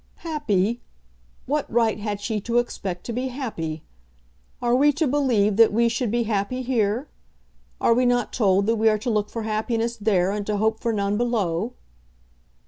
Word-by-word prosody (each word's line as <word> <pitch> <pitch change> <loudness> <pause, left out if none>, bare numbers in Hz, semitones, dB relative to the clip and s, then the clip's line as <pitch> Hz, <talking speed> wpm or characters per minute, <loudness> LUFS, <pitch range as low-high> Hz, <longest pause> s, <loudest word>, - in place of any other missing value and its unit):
"Happy? 235 - 0 0.6
What 295 +2 -2
right 225 -2 +2
had 205 -1 -3
she 210 0 -2
to 235 +3 -1
expect 195 -7 -2
to 235 - -4
be 250 +3 -2
happy? 190 - -5 0.8
Are 240 0 +1
we 285 +4 +5
to 315 +3 0
believe 245 -8 +2
that 225 -1 +6
we 235 +2 +3
should 235 0 -1
be 235 +2 +1
happy 220 +4 -2
here? 235 +1 0 0.7
Are 230 - +4
we 250 +1 +2
not 245 0 +1
told 200 -4 +2
that 225 +2 +1
we 220 +1 +4
are 215 - +2
to 225 +3 -2
look 210 -1 0
for 230 - -5
happiness 225 +2 -1
there, 195 -4 +2
and 205 0 -2
to 210 -1 0
hope 220 +1 +1
for 235 - -1
none 200 -1 0
below?" 220 -3 -1
225 Hz, 180 wpm, -24 LUFS, 205-245 Hz, 0.8 s, that